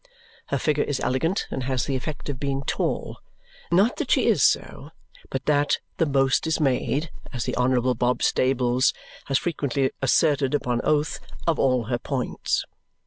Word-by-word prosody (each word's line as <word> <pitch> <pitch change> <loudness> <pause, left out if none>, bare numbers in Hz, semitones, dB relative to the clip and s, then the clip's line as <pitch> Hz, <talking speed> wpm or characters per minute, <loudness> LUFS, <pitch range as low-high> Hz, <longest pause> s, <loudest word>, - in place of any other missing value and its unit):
Her - - 0
figure 150 -1 +1
is 145 -3 -2
elegant 165 +9 0
and 130 - -3
has 130 -1 0
the 135 - -1
effect 140 +3 -5
of 140 -4 -4
being 140 -1 -2
tall. - - -2 0.5
Not 195 +8 +3
that - - -3
she - - +3
is - - +3
so, - - +1 0.4
but - - -4
that 145 -1 +2 0.2
"the 165 - +2
most 135 +2 +2
is 160 - 0
made," 145 +2 0 0.2
as 120 -3 -3
the 125 - -2
Honourable 125 0 +2
Bob 125 +1 0
Stables 130 -1 +2 0.3
has 135 - +1
frequently 140 -5 -1
asserted 140 0 +2
upon 125 -4 -1
oath, 150 +1 +1 0.3
"of 165 -2 +1
all 130 -3 +2
her 120 +2 -2
points." 130 -3 -2
135 Hz, 165 wpm, -24 LUFS, 125-150 Hz, 0.5 s, Not